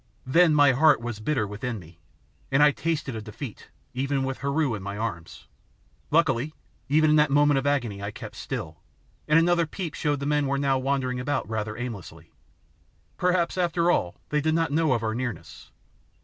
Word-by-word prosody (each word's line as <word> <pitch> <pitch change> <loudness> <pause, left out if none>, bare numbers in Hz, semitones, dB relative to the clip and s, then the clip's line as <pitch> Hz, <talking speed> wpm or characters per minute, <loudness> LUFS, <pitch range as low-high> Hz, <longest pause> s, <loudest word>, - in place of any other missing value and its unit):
Then 160 +4 +4
my 145 -2 +6
heart 140 +2 +5
was 120 -2 -5
bitter 110 0 0
within 110 +4 -4
me, 85 -2 -14 0.5
and 135 +2 +5
I 150 - +6
tasted 150 -3 -2
of 110 - -5
defeat, 110 +2 -9 0.2
even 135 +1 -1
with 135 0 -3
Heru 140 -1 0
in 105 - -4
my 100 +1 -5
arms. 105 -7 -5 0.6
Luckily 150 -2 +1 0.3
even 155 +2 +4
in - - +5
that 150 -1 +4
moment 145 0 +4
of 140 - -3
agony 120 -8 -1
I 100 - -3
kept - - -9
still, - - -6 0.5
and 155 - +5
another 170 0 +3
peep 170 -1 -5
showed 145 -2 -1
the 140 - -4
men 150 -1 +1
were 140 0 0
now 135 -1 +1
wandering 130 -2 -1
about 135 -1 -2
rather 110 0 -3
aimlessly. 115 -7 -7 0.9
Perhaps 180 0 +1
after 175 -1 +2
all 90 - 0
they 150 0 +1
did 160 +1 +1
not 165 -2 +1
know 155 -1 +2
of 115 -2 -1
our 110 -1 -1
nearness? 120 -7 -6
140 Hz, 185 wpm, -26 LUFS, 115-150 Hz, 0.9 s, my